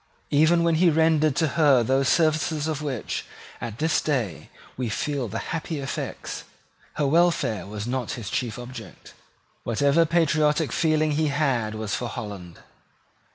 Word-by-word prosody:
Even 160 +4 +4
when 170 0 +3
he 180 - +6
rendered 155 -2 +3
to 160 -1 +1
her 140 -5 +4
those 135 +3 +2
services 155 -1 +1
of 155 -2 -2
which, 135 -6 -3 0.4
at 115 -2 -5
this 160 +3 +1
day, 125 - -2 0.3
we 125 -2 -3
feel 140 +3 -2
the 100 - -5 0.2
happy 160 -1 -3
effects, 135 - -5 0.5
her 150 - 0
welfare 140 - +2
was 105 0 -5
not 125 -1 -2
his 115 -5 -6
chief 120 -4 -2
object. 120 -6 -10 0.5
Whatever 140 +8 +2
patriotic 155 -2 +2
feeling 155 -2 +2
he 155 +1 +1
had 135 -7 0
was 110 -1 -4
for 125 - -2
Holland. 100 -6 -7
145 Hz, 150 wpm, -25 LUFS, 120-155 Hz, 0.5 s, he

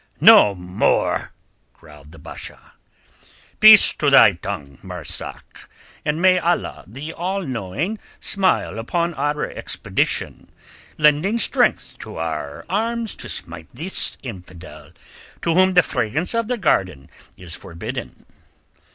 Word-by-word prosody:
"No 100 -1 +7
more!" 90 0 -1 0.4
growled 75 -2 -17
the 80 - -14
Basha. 75 - -10 0.9
"Peace 215 -1 +9
to - - 0
thy 135 -6 +7
tongue, 85 -7 -7
Marzak, - - -6 0.3
and 150 +1 -1
may 185 0 +4
Allah 175 0 -2
the 140 +10 -8
All 190 +3 -3
knowing 135 - -4 0.2
smile 190 - 0
upon 170 +9 -2
our 145 +1 -2
expedition, - - -3 0.5
lending 150 +8 +3
strength 230 - +2
to - - -9
our 80 -3 -5
arms 225 +3 -2
to - - -6
smite 85 -2 -6
the 165 +9 -6 0.3
infidel 90 - -11 0.5
to 165 - +1
whom 185 +1 +3
the 180 - +6
fragrance 150 - -2
of 230 -1 -1
the 250 0 -2
garden 90 - 0 0.3
is 90 -2 -10
forbidden." 110 +10 -8
140 Hz, 120 wpm, -20 LUFS, -, 0.9 s, Peace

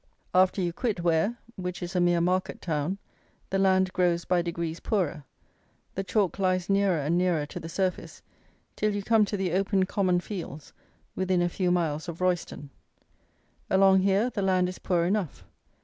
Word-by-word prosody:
After 185 +1 +4
you 175 -2 -1
quit 205 -4 -2
Ware, 170 +7 +1 0.2
which 180 -1 -4
is 175 +2 -6
a - - +3
mere 175 -1 +3
market 185 +2 0
town, 160 +3 -2 0.5
the 195 - +1
land 190 -1 +3
grows 175 -2 +1
by 180 -1 +2
degrees 170 -1 -4
poorer; 170 - -1 0.7
the 195 - -3
chalk 200 -1 0
lies 185 0 +1
nearer 195 -3 +3
and 155 +4 +1
nearer 175 -5 +1
to - - -7
the 165 - -8
surface, 185 +1 -3 0.5
till 215 -1 0
you 205 - -3
come 220 0 +4
to 205 - -3
the 190 -3 -1
open 190 +1 +1
common 185 -2 +1
fields 170 -6 -7 0.4
within 185 -1 +1
a 175 - +1
few 180 +1 -1
miles 165 -2 0
of 170 - -7
Royston. 175 -6 -2 1.0
Along 190 0 +5
here 200 +5 +2
the 205 - -3
land 185 -2 +2
is 185 - -7
poor 175 -2 +1
enough. 180 - -2
185 Hz, 175 wpm, -27 LUFS, 170-195 Hz, 1.0 s, Along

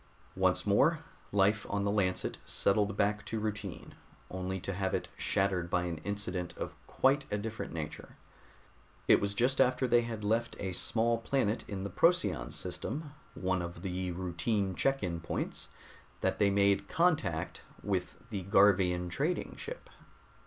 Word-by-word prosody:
Once - - +2
more - - +4 0.3
life 100 +1 +3
on 100 0 0
the 100 - +1
Lancet 95 -3 0
settled 100 0 +1
back 105 +1 +1
to 110 - -3
routine, 105 -3 -4 0.4
only 95 +1 -3
to 100 - -4
have 95 0 0
it - - -3
shattered 95 -3 0
by 90 0 +1
an 85 -3 -3
incident 95 -2 -3
of - - -4
quite 135 +1 +2
a 105 - 0
different 110 +2 -5
nature. 80 -2 -6 0.9
It - - +6
was 100 0 -1
just 130 +4 +3
after 130 0 +3
they 120 0 +5
had 115 -2 -5
left 115 +3 0
a 95 -2 -3
small 115 +5 +2
planet 115 -2 0
in 95 -2 -4
the 100 - -4
Procyon 170 - +2
system, 150 0 -5 0.2
one 95 -1 0
of 85 0 -6
the 90 -1 -2
routine 95 +3 -1
check 135 +5 +1
in 85 -2 -2
points, 80 - -4 0.5
that - - 0
they 100 - +5
made 100 0 +3
contact 160 - +1 0.2
with 95 -3 -1 0.2
the 100 -3 -2
Garvian 95 -3 +4
trading 145 - -1
ship. - - -8
100 Hz, 155 wpm, -32 LUFS, 90-115 Hz, 0.9 s, It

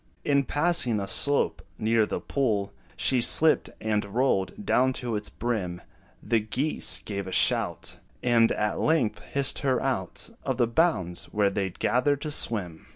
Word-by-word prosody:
In 140 -1 +2
passing 145 -8 +1
a 100 - -4
slope 145 +7 +2 0.2
near 110 -1 +2
the - - -3
pool, 105 -8 -1 0.2
She 130 -2 +2
slipped 155 +6 +4
and 105 -1 -1
rolled 100 -3 -1
down 130 +1 +2
to 120 -3 -4
its 105 0 -4
brim; 100 -7 -3 0.4
The 115 - +1
geese 130 +8 -2
gave 100 -2 -4
a - - -6
shout, - - +1 0.3
And 115 -2 +3
at 105 0 -1
length 150 -9 +1
hissed 140 -1 +1
her 130 -3 +1
out 110 -9 -2
Of 130 -2 -2
the 120 - +3
bounds, 115 - 0
where 105 -1 0
they 95 -1 -2
'd 85 - -17
gathered 140 +3 +1
to 155 - -3
swim. 95 - -1
115 Hz, 160 wpm, -26 LUFS, 100-135 Hz, 0.4 s, slipped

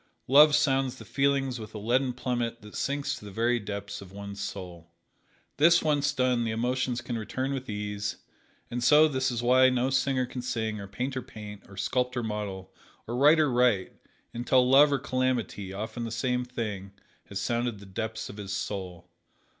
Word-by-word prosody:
Love 145 +3 +7
sounds 135 -3 +2
the - - -12
feelings 135 -2 0
with 110 0 -9
a - - -3
leaden 125 +5 +1
plummet 120 -2 -3
that 105 - -12
sinks 140 0 -1
to - - -8
the 105 - -8
very 115 +4 +1
depths 100 -1 -6
of 95 -2 -12
one's 100 0 -7
soul. 90 -3 -7 0.7
This 165 +4 +5
once 145 -2 +2
done 125 -3 +1
the 115 - -1
emotions 120 +2 -1
can 120 -1 -4
return 130 +5 -3
with 130 -2 -5
ease, 105 0 -3 0.6
and 120 0 -2
so 150 +5 +7
this 130 -3 0
is 120 -1 -3
why 130 +1 +6
no 125 +1 0
singer 135 -1 +1
can 125 0 -6
sing, 110 -3 -2
or 100 - -7
painter 130 +6 -3
paint, 105 -3 -10
or 100 - -13
sculptor 125 +4 -1
model, 100 -4 -5 0.3
or 120 - -4
writer 150 +2 +5
write, 120 -6 +2 0.4
until 125 +1 +3
love 140 +3 +7
or 140 - +3
calamity, 130 -7 -1
often 110 +4 -5
the 115 - -3
same 125 +2 -1
thing, 105 -6 -5 0.3
has 100 - -5
sounded 120 +2 -1
the 100 - -12
depths 110 +3 -4
of 100 - -10
his 100 -2 -6
soul. 95 -3 -5
120 Hz, 180 wpm, -28 LUFS, 105-130 Hz, 0.7 s, Love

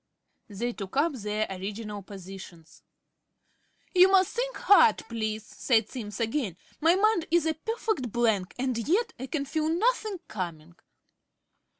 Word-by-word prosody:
They 235 +4 -3
took 195 +3 -7
up 305 +2 +3
their 210 -3 -2
original 205 +2 -5
positions. 190 -4 -11 1.1
"You 370 0 +7
must 380 -2 +4
think - - -2
hard, 395 - +6
please," 220 -2 -3
said 225 -3 +1
Simms 215 -5 -6
again. 225 - -1 0.2
"My 330 +3 +4
mind 405 -3 +2
is 335 -1 +3
a 320 - +2
perfect 385 - -2
blank, 220 -5 +1
and 255 0 -1
yet 365 - +1
I 260 - -5
can 280 -1 -2
feel 310 +2 -1
nothing 430 +3 +1
coming." 170 -4 -6
240 Hz, 135 wpm, -28 LUFS, 205-335 Hz, 1.1 s, You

